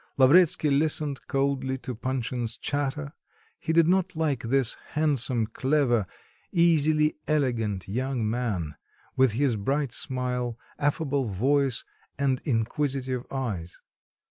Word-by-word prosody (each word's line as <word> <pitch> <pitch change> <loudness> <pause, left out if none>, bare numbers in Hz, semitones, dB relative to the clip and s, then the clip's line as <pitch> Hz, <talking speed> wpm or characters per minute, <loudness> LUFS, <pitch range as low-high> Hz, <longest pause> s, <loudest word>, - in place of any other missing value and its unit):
Lavretsky 150 +2 +5
listened 145 -1 +1
coldly 135 -1 0
to 130 -1 -6
Panshin's 120 -1 -3
chatter; 145 +1 -3 0.5
he 160 - -2
did 165 0 +4
not 185 0 +1
like 150 -5 0
this 130 +1 +2 0.2
handsome, 135 -6 +2
clever, 120 -2 +1 0.4
easily 155 -3 +3
elegant 115 - 0
young 125 +2 -1
man, 105 -10 -2 0.4
with 130 -4 +4
his 130 0 +1
bright 135 +6 -1
smile, 125 -2 -2 0.2
affable 145 -2 0
voice, 130 +5 +1 0.3
and 135 -2 0
inquisitive 130 +1 -1
eyes. 105 -11 -4
135 Hz, 110 wpm, -26 LUFS, 120-145 Hz, 0.5 s, Lavretsky